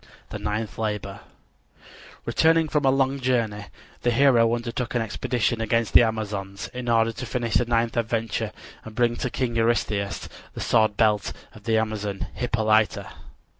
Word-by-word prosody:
THE - - -5
NINTH 105 +1 -3
LABOR 105 -2 -3 1.1
Returning 160 0 +3
from 145 -2 +1
a - - +6
long 135 +1 +1
journey, 115 -5 0 0.4
the 120 - +1
hero 120 -2 +4
undertook 120 +1 -4
an 120 - +2
expedition 115 +1 -1
against 115 0 0
the - - +9
Amazons 100 -3 -2
in 125 -1 -4
order 115 0 +3
to 120 +3 -6
finish 120 -1 -2
the 120 - +3
ninth 115 -1 0
adventure 115 -1 -1 0.3
and 110 -1 -10
bring 120 0 +2
to 130 - -2
King 120 -1 -2
Eurystheus 110 -3 0 0.3
the - - -6
sword 110 -2 +2
belt 105 -2 +2 0.2
of 105 -1 -15
the 115 -1 +2
Amazon 105 -3 -2
Hippolyta. 110 -3 +1
115 Hz, 155 wpm, -25 LUFS, 110-120 Hz, 1.1 s, the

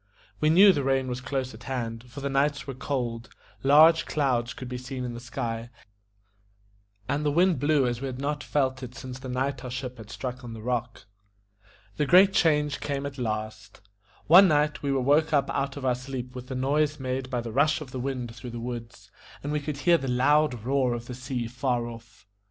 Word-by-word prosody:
We 155 - +3
knew 190 +5 +7
the 145 -4 -1
rain 135 -1 +1
was 125 0 -4
close 130 -2 -3
at 115 +3 -13
hand, 115 -3 -4
for 130 +4 -9
the 140 - -2
nights 140 +1 +1
were 135 - -5
cold; 125 -3 -3 0.3
large 155 +4 +6
clouds 125 -5 0
could 130 - -8
be 125 0 -5
seen 125 0 -6
in 120 -1 -4
the 120 - -7
sky, 120 -1 -4 1.4
and 145 +1 -1
the 150 - +1
wind 175 0 +3
blew 145 -1 +3
as 120 0 -2
we 135 - -2
had 130 -1 -5
not 145 +1 -2
felt 130 -2 0
it 125 -1 -8
since 130 0 -8
the 130 0 -8
night 130 +1 -2
our 125 - -5
ship 125 0 -5
had 110 -1 -11
struck 125 +2 -6
on 120 -2 -7
the 110 - -8
rock. 120 -1 -3 0.9
The 150 - +1
great 190 +5 +7
change 150 -5 +2
came 140 -1 -3
at 140 -1 -6
last. 110 -2 -4 0.5
One 185 +5 +8
night 150 -2 +1
we 140 - -1
were 135 -1 +1
woke 150 +4 +3
up 140 -2 +2
out 140 0 -2
of 135 - -5
our 125 - +3
sleep 125 0 -6
with 125 0 -8
the 130 - -5
noise 145 +3 +1
made 130 0 -3
by 125 -2 -1
the 115 -1 -6
rush 145 +5 +2
of 145 -5 -9
the 130 - -5
wind 125 -3 -4
through 125 +1 -8
the 120 0 -6
woods, 115 -1 -7 0.3
and 145 - -3
we 150 - 0
could 145 0 -5
hear 170 +3 +4
the 135 - -4
loud 130 -1 +2
roar 130 -1 +1
of 120 0 -7
the 125 - -7
sea 125 -1 -4
far 125 0 -1
off. 115 -3 -11
130 Hz, 220 wpm, -27 LUFS, 125-145 Hz, 1.4 s, One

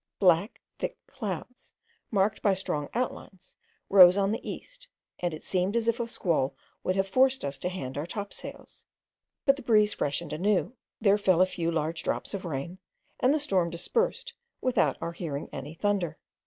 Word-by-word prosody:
Black 180 +3 +3 0.2
thick - - -3
clouds, 225 - -6 0.4
marked 205 0 +1
by 200 -2 +3
strong 150 -5 -2
outlines, 235 -6 -4 0.3
rose 185 -1 +8
on 200 0 +2
the 220 - -2
east, - - -8 0.3
and 175 -1 0
it 155 - -8
seemed 185 +3 0
as 230 -1 +1
if 230 +1 +2
a 235 - -1
squall 165 - 0 0.3
would 185 - 0
have 195 0 +1
forced 260 +6 +3
us 140 -1 -4
to 180 - -2
hand 140 -7 -5
our 155 - -3
topsails; 200 +2 -7 0.6
but 275 -1 +5
the - - -7
breeze 215 -4 +4
freshened 145 +1 -2
anew, 200 +8 +1 0.2
there 205 -1 +4
fell 185 -4 +3
a 185 - +7
few 170 -2 -2
large 160 0 -1
drops - - -2
of 195 -2 -4
rain, 170 +4 -4 0.4
and 255 - +4
the 305 - +3
storm 190 -11 +1
dispersed 470 - -1 0.3
without 255 -1 +2
our 170 - -2
hearing 160 -4 -4
any 150 +3 -6
thunder. 180 -4 0
190 Hz, 175 wpm, -28 LUFS, 170-220 Hz, 0.6 s, rose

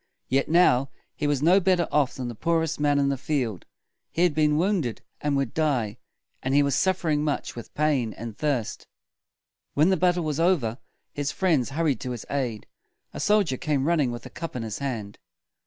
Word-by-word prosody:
Yet 135 +1 +1
now 140 -6 +4 0.3
he 145 - -1
was 145 -1 0
no 180 +5 +6
better 185 -3 +2
off 145 -3 +2
than 130 -2 -4
the 120 - -4
poorest 165 +5 0
man 145 -1 +2
in 140 -1 +2
the 135 -2 -1
field. 125 - -2 0.4
He 170 - 0
had 175 -4 +3
been 150 0 +2
wounded, 170 - 0 0.2
and 145 -1 +1
would 135 -4 -1
die; 130 -10 0 0.4
and 130 +2 0
he 145 - +6
was 140 -1 +1
suf 190 -1 +2
fer 170 - -3
ing 150 -1 +2
much 150 -2 -2
with 120 - -9
pain 145 -7 +1
and 115 -1 -7
thirst. 140 -6 -2 0.9
When 155 +5 +4
the 190 - +3
battle 175 0 +2
was 155 -1 -2
over, 145 -10 +2 0.3
his 145 0 -2
friends 160 -10 +1
hurried 145 -4 0
to 130 - -4
his 120 - -7
aid. 125 -7 -2 0.5
A - - -6
soldier 205 -11 +2
came 150 -5 0
running 155 -7 +2
with 120 - -7
a - - -9
cup 165 -5 -6
in 120 - -3
his 110 -1 -5
hand. 115 -8 -4
145 Hz, 205 wpm, -26 LUFS, 125-165 Hz, 0.9 s, no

